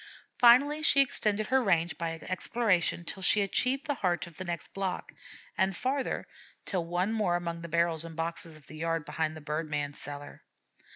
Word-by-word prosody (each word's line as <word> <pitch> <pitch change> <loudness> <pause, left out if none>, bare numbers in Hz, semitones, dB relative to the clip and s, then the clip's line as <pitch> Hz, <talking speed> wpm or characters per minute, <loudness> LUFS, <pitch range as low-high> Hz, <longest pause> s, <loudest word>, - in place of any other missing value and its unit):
Finally 275 +6 +6
she 295 -2 +5
extended 215 -5 +2
her 260 +3 +3
range 175 -6 +2
by 165 -1 -3
exploration 185 -2 +1
till 190 - -5
she 205 +2 +4
achieved 255 +8 +1
the 295 - 0
heart 180 -9 0
of 170 -3 -14
the 185 - -4
next 175 -2 -5
block, 195 -2 -3 0.4
and 190 -2 +1
farther, 265 +1 -1 0.4
till 180 -3 -1
once 175 +5 -1
more 210 -6 +1
among 170 -1 -3
the 170 - -7
barrels 170 -1 +1
and 165 -1 -9
boxes 165 0 -3
of 155 -2 -16
the 155 - -11
yard 165 -1 -1
behind 155 0 -2
the - - -10
bird 155 +1 -3
man's 145 -1 -3
cellar. 145 0 -8
175 Hz, 185 wpm, -30 LUFS, 165-215 Hz, 0.4 s, Finally